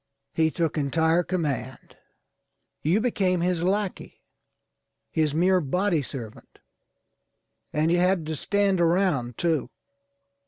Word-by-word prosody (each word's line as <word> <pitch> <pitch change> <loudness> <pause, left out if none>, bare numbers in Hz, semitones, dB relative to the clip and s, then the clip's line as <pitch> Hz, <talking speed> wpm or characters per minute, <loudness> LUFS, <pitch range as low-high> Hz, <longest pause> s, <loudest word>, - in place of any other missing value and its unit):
He 160 -1 +2
took 160 -1 -1
entire 160 +4 +2
command. 150 -8 -4 0.9
You 170 +8 +2
became 190 -7 +1
his 175 -1 0
lackey, 195 +2 -2 0.9
his 155 -2 0
mere 180 +2 +3
body 175 +3 0
servant, 120 -5 -9 1.1
and 155 +2 +1
you 175 - +3
had 180 -2 +2
to 160 0 -3
stand 200 +2 +1
around 165 - +1
too. 165 -4 0
170 Hz, 110 wpm, -25 LUFS, 150-185 Hz, 1.1 s, mere